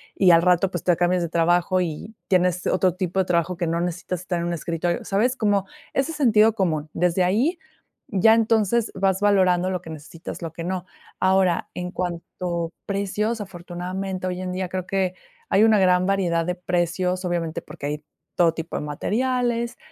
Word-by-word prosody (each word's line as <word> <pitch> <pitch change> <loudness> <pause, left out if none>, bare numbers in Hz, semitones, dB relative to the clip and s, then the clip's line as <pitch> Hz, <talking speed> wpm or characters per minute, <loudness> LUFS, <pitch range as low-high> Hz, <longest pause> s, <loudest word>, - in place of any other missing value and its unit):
y 185 -2 +5
al 165 -1 +6
rato, 180 +1 +3
pues, 175 - -4
te 175 - +3
cambias 175 +1 +1
de 170 - -2
trabajo, 175 +2 +2
y 175 +6 -5
tienes 180 -2 +2
otro 185 -1 +2
tipo 185 0 -2
de 190 - +2
trabajo 175 0 0
que 175 -1 -1
no 165 +1 0
necesitas 175 0 -3
estar 180 -1 -2
en 170 - -2
un 175 - -1
escritorio, 170 +1 -2
¿sabes? 230 +6 +1
Como 205 -5 +1 0.3
ese 275 +4 0
sentido 225 -7 +4
común. 160 -7 -1
Desde 180 +1 +2
ahí, 230 - +1 0.5
ya 205 +3 +5
entonces 225 0 +2
vas 190 0 +1
valorando 185 -3 +3
lo 180 -2 -2
que 165 - -11
necesitas, 160 +3 -8
lo 165 -1 -5
que 165 - -6
no. 185 0 -3 0.3
Ahora, 185 -2 +2
en 180 0 -4
cuanto 170 -1 -3
precios, 205 +3 -1
afortunadamente, 185 0 -5
hoy 180 0 -3
en 185 -1 -3
día, 185 0 -2
creo, 185 0 -3
que 190 -1 -1 0.3
hay 205 - +4
una 220 -2 +5
gran 180 -1 +4
variedad 180 -4 +1
de 180 - -1
precios, 180 +1 -1
obviamente, 170 -2 -2
porque - - -9
hay 150 +1 -4 0.3
todo 170 -2 +4
tipo 165 0 -6
de - - -2
materiales, 235 - -1
180 Hz, 185 wpm, -23 LUFS, 175-195 Hz, 0.5 s, al